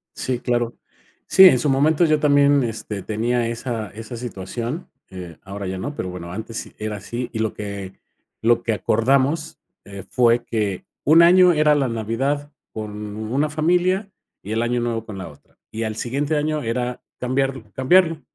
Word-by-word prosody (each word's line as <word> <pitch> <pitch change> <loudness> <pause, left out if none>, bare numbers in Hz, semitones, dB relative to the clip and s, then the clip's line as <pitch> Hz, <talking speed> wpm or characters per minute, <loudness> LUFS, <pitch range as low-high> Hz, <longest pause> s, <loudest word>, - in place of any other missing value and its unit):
Sí, 125 -2 -2
claro. 120 -1 -1 0.5
Sí, 190 - +8
en 130 -10 +7
su 145 - 0
momento, 150 +5 +3
yo 155 -1 +3
también, 145 -1 +4
este 110 -3 -4
tenía 115 +3 0
esa 115 -2 -4
esa 110 +3 -8
situación. 120 - -5 0.2
Eh, 90 -3 -9
ahora 100 0 -6
ya 95 0 -3
no, 145 +10 -5
pero 90 - -4
bueno, 85 -1 -7
antes 110 +4 -6
era 105 -1 -4
así, 120 +5 -5
y 110 - -3
lo 110 -1 0
que 100 -2 -6 0.5
lo 115 +1 +3
que 115 - 0
acordamos, 135 +9 +1 0.3
eh, 100 -1 -9
fue 120 -1 +3
que 105 -5 -2 0.2
un 160 +4 +7
año 180 +1 +7
era 150 -1 +4
la 140 -3 +1
Navidad 130 +6 -2 0.2
con 105 -1 -6
una 130 +8 -1
familia 180 +6 +1 0.3
y 105 - -7
el 115 - 0
Año 120 0 0
Nuevo 115 -2 -2
con 105 -3 -8
la 95 -3 -6
otra, 75 - -20
y 110 +1 -3
al 110 -1 -3
siguiente 140 +7 -1
año 150 0 -1
era 125 +2 -2 0.2
cambiarlo 130 0 -1
cambiarlo. 165 +4 +3
120 Hz, 175 wpm, -22 LUFS, 110-145 Hz, 0.5 s, Sí